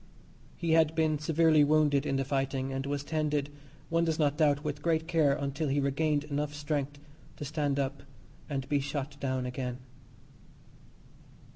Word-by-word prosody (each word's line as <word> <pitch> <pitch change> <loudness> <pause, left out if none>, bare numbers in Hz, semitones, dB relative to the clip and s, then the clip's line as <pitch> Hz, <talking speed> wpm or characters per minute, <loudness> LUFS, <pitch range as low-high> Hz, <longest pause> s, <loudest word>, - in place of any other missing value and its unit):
He 170 -2 -1
had 160 -1 +4
been 155 -2 +2
severely 155 0 +4
wounded 150 -1 +3
in 135 - 0
the 135 0 0
fighting, 135 0 -1
and 135 +1 -3
was 140 0 -2
tended, 150 -2 -1 0.4
one 165 0 +2
does 160 -2 0
not 145 -2 +2
doubt 150 -2 +2
with 150 -1 -3
great 160 0 +1
care, 160 -5 +3
until 140 +2 -2
he 140 +1 +1
regained 145 +1 +1
enough 145 0 -3
strength 145 -1 -2 0.4
to 145 - -5
stand 145 -1 -1
up 140 0 -2 0.5
and 135 -2 -3
be 145 0 +2
shot 140 0 -4
down 130 -2 -1
again. 125 -1 -4
145 Hz, 160 wpm, -30 LUFS, 140-155 Hz, 0.5 s, had